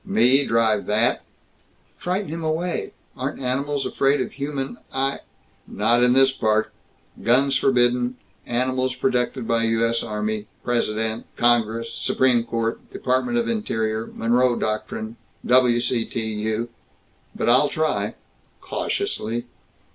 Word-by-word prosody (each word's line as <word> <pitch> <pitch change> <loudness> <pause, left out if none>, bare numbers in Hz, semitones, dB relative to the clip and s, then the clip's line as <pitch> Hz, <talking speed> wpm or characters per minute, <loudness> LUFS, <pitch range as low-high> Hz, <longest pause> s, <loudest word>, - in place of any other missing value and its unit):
"Me? 145 - +4
Drive 115 -4 +1
that?" 110 +4 +2 0.7
"Frighten 185 0 -2
him 165 +1 -5
away. 165 +3 -2 0.2
Aren't - - -4
animals 135 +2 -1
afraid 140 +1 +2
human 135 -2 -4
eye 135 +1 -1 0.3
" - - -37
"Not 120 +1 +2
in 125 0 +5
this 135 +1 +5
park. 110 -4 0 0.5
Guns 130 +5 +3
forbidden. 125 -1 +2 0.3
Animals 130 +1 0
protected 125 -2 0
by 115 0 +2
U. 115 0 +2
S. 115 0 0
Army, 105 -1 -3 0.2
President, 110 -2 -1
Congress, 115 -1 +2
Supreme 125 -3 +2
Court, 115 -1 -2
Department 185 - 0
of 235 -1 +1
Interior, 110 - -1
Monroe 120 +2 +2
Doctrine, 110 +1 -3 0.3
W. 125 -1 +4
C. 120 -1 0
T. - - -4
U. 110 +1 -2 0.7
But - - -2
I'll 130 +5 +5
try 110 -10 -1 0.4
cautiously." 115 +2 -3
120 Hz, 125 wpm, -23 LUFS, 115-135 Hz, 0.7 s, in